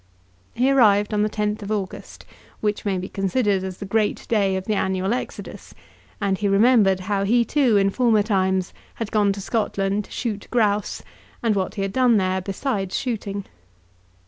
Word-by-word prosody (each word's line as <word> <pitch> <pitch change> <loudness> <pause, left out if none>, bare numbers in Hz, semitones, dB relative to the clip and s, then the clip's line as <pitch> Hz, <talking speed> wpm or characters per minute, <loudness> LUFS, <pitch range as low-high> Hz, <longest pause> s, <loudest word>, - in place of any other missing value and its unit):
He 255 +3 +2
arrived 210 -5 +4
on 210 - +1
the 210 - +1
10th 210 0 -2
of 200 - -7
August, 200 -3 -5 0.3
which 210 0 -2
may 195 -2 0
be 185 +1 -4
considered 195 0 0
as 190 -1 -5
the 200 - -6
great 210 +1 0
day 200 -4 +2
of 190 0 -3
the 215 - 0
annual 190 +1 0
exodus, 250 - -7 0.4
and 195 -2 0
he 205 - 0
remembered 200 -2 +4
how 195 +1 -1
he, 235 +4 +3
too, 255 -4 +3
in 195 0 +3
former 225 -2 +3
times 190 -3 0 0.2
had 225 -2 -5
gone 205 -2 +3
to 200 - -7
Scotland 200 -1 -1
to - - -20
shoot 215 -4 -4
grouse, 210 -4 0 0.4
and 225 -3 +2
what 190 -1 -2
he 200 - -2
had 195 0 -3
done 250 -3 +4
there 185 -1 0
besides 195 0 -2
shooting. 205 -5 -3
205 Hz, 180 wpm, -23 LUFS, 195-220 Hz, 0.4 s, arrived